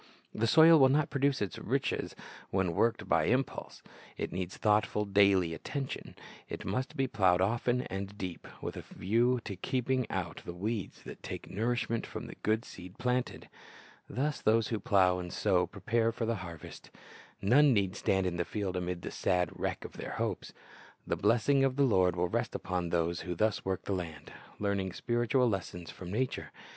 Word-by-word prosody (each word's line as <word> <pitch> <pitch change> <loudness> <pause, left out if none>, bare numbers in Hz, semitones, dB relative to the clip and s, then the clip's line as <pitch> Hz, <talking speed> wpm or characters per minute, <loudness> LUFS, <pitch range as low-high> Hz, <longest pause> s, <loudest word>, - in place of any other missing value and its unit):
The 115 +2 0
soil 160 +4 +8
will 135 -1 +7
not 145 +2 +2
produce 140 -4 +1
its 100 - -5
riches - - -1 0.3
when 95 -3 0
worked 115 +7 +1
by - - +3
impulse. 130 +3 -1 0.3
It - - -3
needs 90 0 -4
thoughtful, 105 0 +2
daily 100 -4 +4
attention. 135 - -5 0.3
It - - -6
must 130 +1 -2
be 135 - +2
plowed 95 -8 +3
often 120 +5 +1
and 100 -1 -5
deep, 90 -4 -6 0.2
with - - -4
a - - -5
view 120 +5 +1
to 100 - -4
keeping 130 +5 -1
out 90 -3 -3
the 85 - -7
weeds 105 +2 -4
that - - -10
take - - -7
nourishment 115 +2 -1
from 110 +2 -6
the - - -8
good 110 +3 +1
seed 90 0 -11
planted. 125 +1 -1 0.6
Thus 145 +4 -1
those 110 +1 +3
who 110 - -1
plow 95 -6 +3
and 90 -1 -6
sow 90 -4 +2
prepare 115 +3 0
for 115 0 -3
the 115 -1 0
harvest. 85 -4 -9 0.5
None 140 +8 +5
need 100 -5 +1
stand 95 -1 +1
in 90 -1 -1
the 85 - +1
field 100 -1 -3
amid 90 -1 -3
the - - -5
sad 90 -1 +1
wreck - - -3
of - - -10
their - - -5
hopes. - - -3 0.5
The - - 0
blessing 115 +9 +3
of 135 -1 +2
the 140 - +3
Lord 90 -7 +3
will 90 0 +1
rest - - -2
upon 90 -1 -2
those 85 0 0
who 90 -1 -4
thus 110 +3 +1
work 95 -1 -2
the 100 - -2
land, 85 -5 -5 0.2
learning 100 -3 -1
spiritual 120 +4 +1
lessons 90 -5 -3
from 90 - -9
nature. 125 +7 -2
105 Hz, 180 wpm, -31 LUFS, 90-120 Hz, 0.6 s, soil